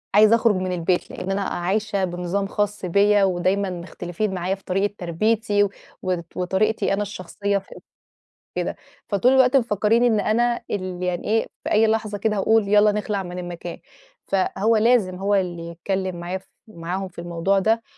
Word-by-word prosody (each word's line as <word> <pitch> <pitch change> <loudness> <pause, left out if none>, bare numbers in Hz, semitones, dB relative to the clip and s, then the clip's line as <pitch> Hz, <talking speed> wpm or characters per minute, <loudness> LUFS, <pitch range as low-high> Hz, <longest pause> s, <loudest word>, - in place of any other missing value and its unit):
عايزة 215 +2 +7
أخرج 230 -2 +3
من 185 0 -2
البيت، 180 0 0
لأن 185 +1 -4
أنا 200 - 0
عايشة 200 +2 -1
بنظام 180 +2 -2
خاص 205 -1 -2
بيّا 200 +3 +4
ودايمًا 190 +1 +1
مختلفين 175 +2 -4
معايا 185 +1 -1
في 195 - -22
طريقة 195 +2 0
تربِيّتي، 205 +4 +1
و 205 - +1 0.7
وطريقتِي 195 +4 +1
أنا 200 - 0
الشخصيّة 200 0 -2
في 195 - -9 0.8
كده، - - -2 0.3
فطول 215 +5 +3
الوقت 260 0 +5
مفكرين 225 -1 +2
إن 230 -3 +3
أنا 235 +3 +1
ال 185 -2 -3
يعني 180 -1 -2
إيه 225 +1 +1 0.2
في - - -4
أي 220 +1 +5
لحظة 215 -1 0
كده 215 +1 0
هاقول 220 +1 +3
يالّا 210 +1 +5
نخلع 205 -1 -2
من 180 0 -6
المكان. 175 -1 -6 0.5
فهو 200 +3 +1
لازم 215 -4 +3
هو 200 +2 +1
اللي 175 -3 -2
يتكلّم 185 +2 -3
معايا 175 +2 -4
ف 185 - -16 0.2
معاهم 185 0 -4
في 180 - -12
الموضوع 175 +3 0
ده، 225 +3 +1
195 Hz, 165 wpm, -23 LUFS, 180-215 Hz, 0.8 s, عايزة